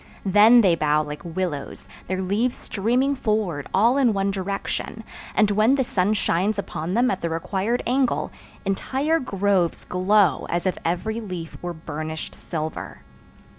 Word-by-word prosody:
Then 210 +5 +7
they 190 -5 +4
bow 155 -1 +2
like 150 0 -7
willows, 170 -4 -4 0.2
their 185 +1 -2
leaves 215 +7 0
streaming 250 +7 0
forward 210 - -1
all 235 +7 +4
in 250 -5 +3
one 195 0 0
direction, 195 +3 -4 0.3
and, 210 -1 +4
when 215 +6 +4
the 270 - +2
sun 205 -2 +1
shines 200 +2 +1
upon 180 -2 -3
them 250 +2 +3
at - - -3
the 170 - -1
required 195 +8 -1
angle, 255 +1 +1 0.3
entire 270 +11 0
groves 195 - 0
glow 190 +2 +2
as 175 +2 -1
if 185 - +1
every 220 +7 -1
leaf 180 -6 -6
were 175 0 -4
burnished 155 0 -6
silver. 155 -2 -6
195 Hz, 150 wpm, -23 LUFS, 170-225 Hz, 0.3 s, Then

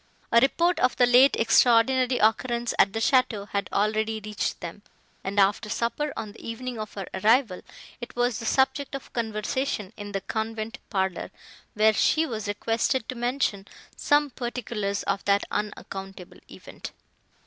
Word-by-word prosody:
A 235 - +7
report 340 +7 +2
of 255 - +2
the 245 - +5
late 250 +3 +6
extraordinary 245 +2 +4
occurrence 235 +2 +1
at 195 - +5
the 225 - -4
château 225 -4 +2
had 200 -2 -2
already 215 +2 0
reached 210 -1 -3
them, 175 +3 -8 0.4
and, 200 +1 -1
after 200 +2 +2
supper, 235 +7 -1
on 215 - -5
the - - -15
evening 235 +1 -5
of 215 -1 -7
her 195 -2 -4
arrival, 215 +1 +2 0.4
it 240 - -8
was 245 -2 0
the 225 - -5
subject 265 +2 +1
of 275 - -9
conversation 220 -1 -2
in 205 0 -7
the 195 -1 -3
convent 220 +3 -4
parlour, 190 -3 -1 0.5
where 215 +1 +4
she 315 +8 +2
was 220 -7 -5
requested 225 +4 -1
to - - -2
mention 240 -5 -1 0.3
some 290 -1 +2
particulars 235 -5 -3
of 195 - -1
that 200 0 +3
unaccountable 195 -3 -6
event. - - -10
225 Hz, 155 wpm, -26 LUFS, 205-250 Hz, 0.5 s, A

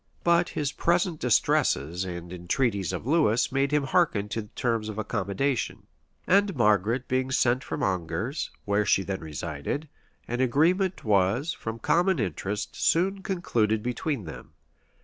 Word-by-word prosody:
But 170 0 +3
his 145 -2 -2
present 175 -1 +1
distresses 90 - +1
and 85 -1 -6
the - - -5
entreaties 100 +2 0
of - - -5
Lewis 140 -6 +2
made 135 +1 +1
him 150 -1 +2
hearken 135 - +1
to 105 0 -4
terms 115 -3 -1
of 110 - -6
accommodation; 110 +5 -2 0.4
and 200 0 +3
Margaret 110 +1 +2
being 130 0 0
sent 130 0 +2
for - - -4
from 145 - -3
Angers, 95 - -2 0.2
where 100 +1 +2
she 95 - +2
then 95 0 -3
resided, 80 - -4 0.4
an 120 +2 -2
agreement 175 +9 +2
was, 105 - +2
from 115 0 -6
common 175 - +2
interest, 100 - -3
soon 190 +4 +1
concluded 115 - 0
between 125 0 -2
them. 75 - -10
120 Hz, 150 wpm, -27 LUFS, 100-150 Hz, 0.4 s, But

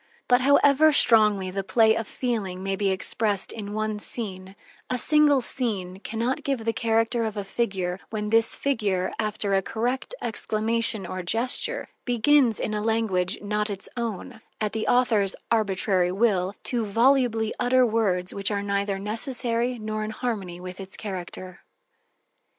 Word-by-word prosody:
But 245 0 +4
however 285 +3 +5
strongly 210 -8 +4
the 195 +1 -3
play 220 +2 +4
of 225 - -3
feeling 200 -7 -3
may 195 0 -1
be 195 0 0
expressed 200 +1 -1
in 205 -2 -7
one 215 -1 -2
scene, 190 -4 -4 0.3
a 255 - 0
single 295 0 +4
scene 200 -8 -1
can 220 +2 -7
not 250 +3 -1
give 270 -5 -2
the 225 - +1
character 230 0 +1
of 220 -1 -3
a 205 - -2
figure 195 -3 -2
when 210 -1 -4
this 225 0 +4
figure, 205 -9 -1
after 215 -2 -1
a 195 - +3
correct 245 - -3
exclamation 220 -1 -1
or 185 +1 -5
gesture, 245 - +1 0.2
begins 245 -1 +3
in 215 - -2
a 210 - -1
language 210 -5 0
not 210 +1 -1
its 195 -1 -4
own, 225 -3 -5 0.2
at 215 -1 -1
the 220 0 -2
author's 225 -6 +3 0.2
arbitrary 195 -4 +1
will, 195 -2 +1
to 240 -2 -1
volubly 230 0 +2
utter 250 +1 +4
words 200 -6 0
which 200 0 0
are 200 -1 -2
neither 200 0 -1
necessary 235 +3 -1
nor 215 -1 -4
in 215 - -4
harmony 210 -7 -4
with 180 +1 -8
its 190 -1 -5
character. 185 -2 -7
215 Hz, 155 wpm, -25 LUFS, 195-235 Hz, 0.3 s, however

